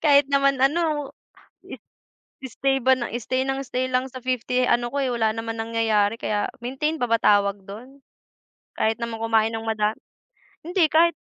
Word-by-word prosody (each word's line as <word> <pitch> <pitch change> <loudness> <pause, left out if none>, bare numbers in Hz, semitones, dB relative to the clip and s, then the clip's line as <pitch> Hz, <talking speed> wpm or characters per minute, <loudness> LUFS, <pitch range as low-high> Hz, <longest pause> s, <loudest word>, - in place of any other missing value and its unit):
Kahit 285 -1 +6
naman 275 0 +3
ano, 295 0 +1 1.3
i 265 - -7
stay 270 +3 0
ba 260 +2 +5
ng 240 -2 -4
stay 255 +2 -2
ng 270 0 -2
stay 255 0 -2
lang 255 +1 0
sa 255 0 -9
50 255 0 0
ano 240 0 +2
ko, - - -2
eh, 265 - 0
wala 225 -2 +1
naman 225 0 -5
nangyayari, 225 -1 +1
kaya 205 -2 -1 0.2
maintain 270 +6 -2
pa - - +3
ba 230 - +4
tawag 200 -1 +3
do'n? 250 +8 -11 0.8
Kahit 220 0 +1
naman 230 -1 -4
kumain 225 -1 +2
ng 225 0 -5
mada 215 -1 0 0.7
hindi! 350 0 +2
Kahit 335 +2 +4
250 Hz, 170 wpm, -23 LUFS, 225-275 Hz, 1.3 s, Kahit